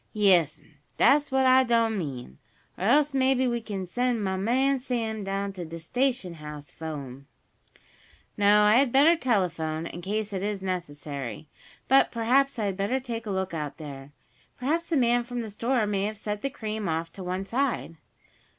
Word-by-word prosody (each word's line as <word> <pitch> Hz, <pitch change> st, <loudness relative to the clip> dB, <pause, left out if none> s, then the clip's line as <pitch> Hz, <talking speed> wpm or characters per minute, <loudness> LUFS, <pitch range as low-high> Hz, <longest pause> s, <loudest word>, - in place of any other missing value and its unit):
"Yes'm, 175 Hz, -8 st, +2 dB, 0.2 s
dat's 290 Hz, 0 st, +4 dB
what 265 Hz, 0 st, +3 dB
I 260 Hz, 0 st, +6 dB
done 230 Hz, -2 st, +2 dB
mean. 125 Hz, -, -6 dB, 0.4 s
Or 185 Hz, -, -4 dB
else 290 Hz, +5 st, +4 dB
maybe 260 Hz, -1 st, +2 dB
we 235 Hz, -1 st, -1 dB
kin 200 Hz, -4 st, -5 dB
send 245 Hz, +3 st, -1 dB
mah 190 Hz, -1 st, -1 dB
man 260 Hz, +8 st, +1 dB
Sam 225 Hz, -4 st, -3 dB
down 195 Hz, 0 st, -3 dB
to 180 Hz, -2 st, -6 dB
de 165 Hz, 0 st, -7 dB
station 245 Hz, +2 st, -1 dB
house 150 Hz, -2 st, -9 dB
fo' 160 Hz, -1 st, -6 dB
'em." 135 Hz, -1 st, -9 dB, 1.1 s
"No, 205 Hz, +1 st, +5 dB
I 210 Hz, +2 st, +6 dB
had 265 Hz, -2 st, +3 dB
better 290 Hz, +6 st, +6 dB
telephone, 170 Hz, -, -1 dB
in 170 Hz, +1 st, -7 dB
case 210 Hz, +3 st, -3 dB
it 190 Hz, -, -2 dB
is 205 Hz, 0 st, -2 dB
necessary. 145 Hz, -, -5 dB, 0.4 s
But 270 Hz, +1 st, +5 dB
perhaps 255 Hz, +4 st, +2 dB
I 215 Hz, -, -1 dB
had 195 Hz, -2 st, -2 dB
better 205 Hz, +7 st, 0 dB
take 230 Hz, -3 st, -5 dB
a -, -, -3 dB
look 190 Hz, -2 st, -2 dB
out 150 Hz, -3 st, -4 dB
there. 140 Hz, -3 st, -9 dB, 0.5 s
Perhaps 320 Hz, +7 st, -1 dB
the 325 Hz, -, +2 dB
man 240 Hz, -1 st, +3 dB
from 245 Hz, 0 st, -4 dB
the 220 Hz, -2 st, -6 dB
store 235 Hz, +2 st, 0 dB
may 200 Hz, -1 st, 0 dB
have 215 Hz, +1 st, -4 dB
set 210 Hz, 0 st, -4 dB
the 275 Hz, -, -1 dB
cream 215 Hz, -7 st, -4 dB
off 165 Hz, +1 st, -2 dB
to 190 Hz, -, -8 dB
one 185 Hz, +2 st, -3 dB
side." 245 Hz, -7 st, -1 dB
210 Hz, 185 wpm, -27 LUFS, 170-250 Hz, 1.1 s, I